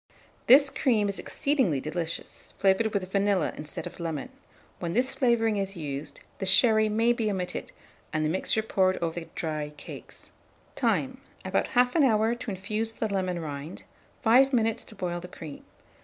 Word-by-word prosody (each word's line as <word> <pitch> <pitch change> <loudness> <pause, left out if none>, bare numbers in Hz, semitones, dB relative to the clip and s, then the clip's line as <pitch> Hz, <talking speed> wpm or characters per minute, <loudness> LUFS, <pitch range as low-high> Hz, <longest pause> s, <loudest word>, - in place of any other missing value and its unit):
This 275 +2 +7
cream 225 -7 +2
is 200 - -1
exceedingly 260 - 0
delicious, 165 +3 -5
flavoured 195 +3 +3
with 190 -3 -2
vanilla 195 -3 +1
instead 150 0 -7
of - - -9
lemon: 165 - -4 0.5
when 170 -1 -3
this 255 +4 +2
flavouring 225 -4 +2
is 195 -1 -3
used, 145 -1 -5 0.2
the 190 - -2
sherry 215 +2 +5
may 225 +3 +3
be 225 -2 -1
omitted, 185 -3 -4 0.4
and 155 0 0
the - - +1
mixture 190 +5 0
poured 190 -3 +2
over 170 0 -2
the 165 - -10
dry 155 -2 -3
cakes. - - -9 0.4
Time. - - 0 0.2
About - - 0
1/2 250 +5 +3
hour 220 -2 +3
to 240 -1 -6
infuse 210 +4 -2
the 220 -2 -3
lemon 185 -2 -1
rind; 150 +1 -6 0.4
5 260 +4 +5
minutes 225 -2 +2
to 215 - -10
boil 175 -3 -3
the 180 - -9
cream. 160 -5 -10
195 Hz, 165 wpm, -27 LUFS, 170-225 Hz, 0.5 s, This